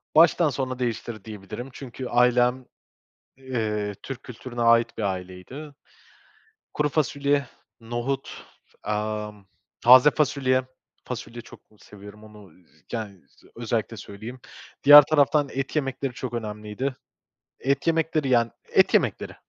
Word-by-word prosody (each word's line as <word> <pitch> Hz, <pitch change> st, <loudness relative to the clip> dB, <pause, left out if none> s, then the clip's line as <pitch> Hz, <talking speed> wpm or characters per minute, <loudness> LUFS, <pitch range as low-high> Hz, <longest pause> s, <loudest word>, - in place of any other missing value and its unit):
Baştan 165 Hz, -1 st, +5 dB
sona 130 Hz, -1 st, -4 dB
değiştirdi 115 Hz, -3 st, -4 dB
diyebilirim 110 Hz, +4 st, -8 dB
çünkü 130 Hz, -1 st, -7 dB
ailem, 125 Hz, +1 st, +2 dB, 0.7 s
eee, 110 Hz, -6 st, -3 dB
Türk 135 Hz, -2 st, -7 dB
kültürüne 120 Hz, -1 st, -7 dB
ait 115 Hz, 0 st, +3 dB
bir 110 Hz, -, -3 dB
aileydi. 95 Hz, +10 st, -6 dB, 1.0 s
Kuru 150 Hz, 0 st, 0 dB
fasulye, 140 Hz, -2 st, 0 dB, 0.3 s
nohut, 120 Hz, +4 st, -4 dB, 0.4 s
ımm, 105 Hz, -1 st, -4 dB, 0.3 s
taze 130 Hz, +4 st, +8 dB
fasulye, 130 Hz, -3 st, +1 dB, 0.4 s
fasulye 120 Hz, -1 st, -7 dB
çok -, -, -15 dB
ı -, -, -23 dB
seviyorum 105 Hz, +1 st, -14 dB
onu, 105 Hz, -4 st, -15 dB
z 75 Hz, -2 st, -29 dB
yani 105 Hz, -5 st, -5 dB
z -, -, -27 dB
özellikle -, -, -3 dB
söyleyeyim. 110 Hz, +6 st, -9 dB, 0.4 s
Diğer 145 Hz, +1 st, +11 dB
taraftan 145 Hz, -1 st, +2 dB
et 135 Hz, +3 st, -4 dB
yemekleri 135 Hz, -2 st, -2 dB
çok 125 Hz, -1 st, -6 dB
önemliydi. 110 Hz, +3 st, -4 dB, 0.6 s
Et 140 Hz, +3 st, -1 dB
yemekleri, 160 Hz, -3 st, +1 dB
yani 115 Hz, -3 st, +3 dB, 0.2 s
et -, -, +4 dB
yemekleri. -, -, +1 dB
125 Hz, 120 wpm, -25 LUFS, 105-135 Hz, 1.0 s, Diğer